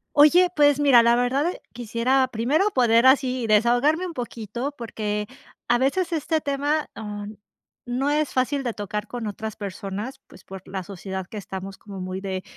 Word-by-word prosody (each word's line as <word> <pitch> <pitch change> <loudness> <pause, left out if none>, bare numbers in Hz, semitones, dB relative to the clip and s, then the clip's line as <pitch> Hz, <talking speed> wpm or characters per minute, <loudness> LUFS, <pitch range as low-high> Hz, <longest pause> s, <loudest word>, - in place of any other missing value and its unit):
Oye, 340 +5 +7
pues 290 -1 +4
mira, 270 -5 +7
la 235 0 +4
verdad, 245 +4 +1 0.3
quisiera 240 +3 +1
primero 280 - +2
poder 240 - +4
así 260 -2 +3
desahogarme 245 - +3
un 345 - -7
poquito, 240 +2 -5
porque 210 -2 -3 0.4
a 240 +1 +4
veces 335 +7 0
este 320 0 0
tema, 290 +1 -1
ah, 205 -2 -6 0.6
no 255 +4 0
es 300 0 0
fácil 270 +2 0
de 240 - -1
tocar 210 +1 -4
con 240 0 -5
otras 220 +1 -5
personas, 200 +4 -6
pues - - -17
por 190 -1 -10
la 190 0 -5
sociedad 190 0 -6
que 215 - -10
estamos 195 0 -7
como 195 -2 -9
muy 185 +1 -4
de 190 -1 -4
240 Hz, 165 wpm, -24 LUFS, 210-280 Hz, 0.6 s, Oye